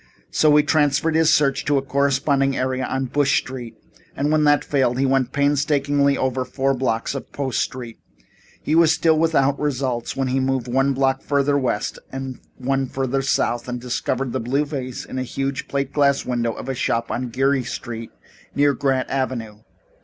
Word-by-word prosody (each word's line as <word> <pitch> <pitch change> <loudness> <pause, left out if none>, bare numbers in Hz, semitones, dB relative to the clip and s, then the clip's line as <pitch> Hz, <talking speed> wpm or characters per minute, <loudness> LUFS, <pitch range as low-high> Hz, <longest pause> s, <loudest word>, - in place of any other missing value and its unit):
So 150 -1 +4
he 150 - +6
transferred 150 +1 +2
his 160 0 +4
search 140 -2 +2
to 145 -1 +2
a 135 - 0
corresponding 140 0 +1
area 130 0 -1
on 135 0 -1
Bush 140 +2 +2
Street, 125 -3 -5 0.4
and 145 +2 0
when 155 -1 +3
that 145 0 +3
failed, 130 -4 +1
he 135 - +2
went 130 -2 +1
painstakingly 145 -1 +2
over 130 0 0
four 135 +2 0
blocks 125 -3 -1
of 135 - -7
Post 135 -4 -2
Street. 120 -3 -4 0.6
He - - -1
was 165 -1 +5
still 160 +1 +3
without 145 -4 +2
results 130 -5 -2
when 135 -1 -1
he 130 +1 +1
moved 130 -2 -1
one 135 +3 +2
block 135 0 +1
further 140 0 +1
west 125 -7 -1
and 135 -1 -6 0.2
one 135 +1 -1
further 135 +1 -1
south 120 -3 0
and 125 0 -3
discovered 125 +1 -2
the - - -1
blue 135 +6 0
vase 130 -4 -5
in 130 - -5
a - - -1
huge 135 +2 -3
plate 140 -1 -2
glass 140 -2 +2
window 120 -2 -1
of - - -8
a 135 - -1
shop 115 -2 -1
on 125 0 -2
Geary 135 +2 +1
Street 120 -2 -6 0.5
near 145 0 +3
Grant 135 -2 0
Avenue. 120 -6 -3
135 Hz, 185 wpm, -22 LUFS, 130-140 Hz, 0.6 s, he